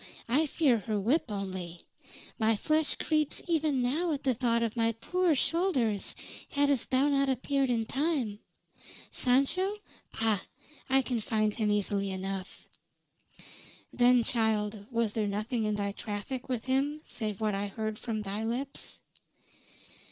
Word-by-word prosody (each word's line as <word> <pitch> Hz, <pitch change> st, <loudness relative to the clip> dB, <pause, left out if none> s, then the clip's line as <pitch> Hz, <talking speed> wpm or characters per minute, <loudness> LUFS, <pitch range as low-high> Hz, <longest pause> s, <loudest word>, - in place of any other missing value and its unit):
I 290 Hz, +7 st, +3 dB
fear 270 Hz, -6 st, +3 dB
her 210 Hz, +1 st, -2 dB
whip 245 Hz, +12 st, +2 dB
only. 185 Hz, -4 st, -4 dB, 0.6 s
My 220 Hz, 0 st, +3 dB
flesh 310 Hz, +7 st, +1 dB
creeps 305 Hz, -2 st, 0 dB
even 305 Hz, -6 st, +1 dB
now 315 Hz, +8 st, +1 dB
at 285 Hz, -, -4 dB
thought 240 Hz, -3 st, +2 dB
of 230 Hz, -1 st, -2 dB
my 230 Hz, -1 st, +2 dB
poor 350 Hz, +8 st, +1 dB
shoulders 265 Hz, -, +1 dB, 0.3 s
hadst 285 Hz, -3 st, +2 dB
thou 265 Hz, +2 st, +3 dB
not 275 Hz, -1 st, +2 dB
appeared 270 Hz, +1 st, +1 dB
in 230 Hz, -2 st, +1 dB
time. 265 Hz, -6 st, 0 dB, 0.7 s
Sancho? 280 Hz, +11 st, +2 dB, 0.4 s
Pah! 220 Hz, -3 st, +2 dB, 0.5 s
I 265 Hz, 0 st, +4 dB
can 245 Hz, -2 st, -1 dB
find 215 Hz, -1 st, +1 dB
him 215 Hz, -2 st, 0 dB
easily 205 Hz, -1 st, 0 dB
enough." 190 Hz, 0 st, -5 dB, 1.3 s
"Then, 245 Hz, 0 st, +5 dB
child, 215 Hz, -3 st, +1 dB
was 230 Hz, -3 st, 0 dB
there 215 Hz, -2 st, 0 dB
nothing 215 Hz, +3 st, -1 dB
in 210 Hz, 0 st, 0 dB
thy 200 Hz, -1 st, -1 dB
traffic 215 Hz, +6 st, -5 dB
with 245 Hz, -3 st, -1 dB
him 275 Hz, +3 st, 0 dB
save 215 Hz, -4 st, -4 dB
what 215 Hz, -1 st, 0 dB
I 200 Hz, +1 st, -1 dB
heard 215 Hz, +1 st, -4 dB
from 220 Hz, -3 st, -3 dB
thy 205 Hz, +2 st, -3 dB
lips?" 255 Hz, +5 st, -3 dB
235 Hz, 140 wpm, -30 LUFS, 210-275 Hz, 1.3 s, Then